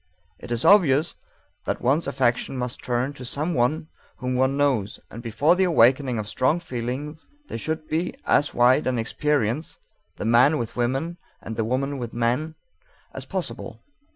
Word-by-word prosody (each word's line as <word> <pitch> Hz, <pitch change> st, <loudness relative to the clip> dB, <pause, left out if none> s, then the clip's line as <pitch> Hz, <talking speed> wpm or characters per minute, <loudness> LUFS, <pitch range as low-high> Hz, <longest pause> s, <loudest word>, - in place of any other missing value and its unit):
It -, -, -10 dB
is 120 Hz, 0 st, 0 dB
obvious 160 Hz, -7 st, +5 dB, 0.5 s
that -, -, -2 dB
one's 140 Hz, +6 st, +2 dB
affection 130 Hz, -1 st, 0 dB
must 125 Hz, -1 st, -4 dB
turn 125 Hz, +3 st, -1 dB
to 135 Hz, -, -10 dB
some 150 Hz, +7 st, -1 dB
one 150 Hz, +5 st, 0 dB, 0.3 s
whom 125 Hz, -1 st, -3 dB
one 130 Hz, +2 st, +1 dB
knows, 130 Hz, -8 st, 0 dB
and 115 Hz, -, -8 dB
before 125 Hz, +9 st, +2 dB
the 190 Hz, +1 st, +2 dB
awakening 130 Hz, -5 st, +3 dB
of 105 Hz, -1 st, -4 dB
strong 130 Hz, +9 st, +1 dB
feeling 135 Hz, 0 st, -4 dB, 0.3 s
there -, -, -4 dB
should 155 Hz, +3 st, -3 dB
be 165 Hz, +3 st, -2 dB
as 145 Hz, -, +3 dB
wide 125 Hz, +4 st, +3 dB
an 130 Hz, -1 st, 0 dB
experience 140 Hz, +3 st, -1 dB, 0.4 s
the -, -, -4 dB
man 125 Hz, +7 st, +5 dB
with 115 Hz, -4 st, -4 dB
women, 135 Hz, +8 st, -1 dB, 0.2 s
and 110 Hz, -, -7 dB
the 110 Hz, -, 0 dB
woman 135 Hz, +4 st, -1 dB
with 120 Hz, -2 st, -6 dB
men 125 Hz, +7 st, 0 dB, 0.6 s
as -, -, -6 dB
possible. -, -, -5 dB
130 Hz, 165 wpm, -24 LUFS, 120-150 Hz, 0.6 s, obvious